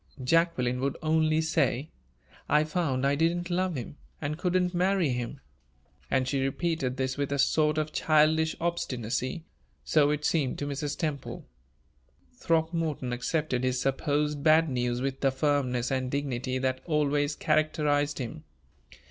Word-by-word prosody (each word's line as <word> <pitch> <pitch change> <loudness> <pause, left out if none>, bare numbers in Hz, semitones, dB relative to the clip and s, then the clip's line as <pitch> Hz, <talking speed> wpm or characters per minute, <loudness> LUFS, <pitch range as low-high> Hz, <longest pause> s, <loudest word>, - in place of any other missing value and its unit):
Jacqueline 125 -4 +2
would 135 +1 -1
only 155 0 +2
say, 155 -3 0 0.6
"I 150 +1 +4
found 155 -5 -1
I 140 - +3
didn't 170 +4 0
love 180 -1 0
him, 130 +3 -6 0.2
and 150 0 -2
couldn't 180 +1 0
marry 180 -2 +2
him"; 125 +2 -3 0.7
and 130 -1 +1
she 135 0 0
repeated 135 -2 -1
this 130 0 -1
with 140 -1 -2
a 140 - 0
sort 150 +2 +2
of 155 0 -1
childish 160 +1 +3
obstinacy 150 - -2 0.4
so 145 -2 +4
it 150 0 -1
seemed 145 -6 +1
to 145 - -3
Mrs. 145 +1 -3
Temple. 150 -4 -4 0.9
Throckmorton 160 -5 -1
accepted 130 0 -1
his 130 0 0
supposed 145 +2 0
bad 160 0 +5
news 125 -1 -1
with 135 0 -2
the 135 - +3
firmness 130 -3 0
and 130 -1 -1
dignity 130 -2 -2
that 130 0 -1
always 145 -2 +1
characterized 150 -1 +1
him. 145 +4 -6
145 Hz, 140 wpm, -28 LUFS, 130-160 Hz, 0.9 s, bad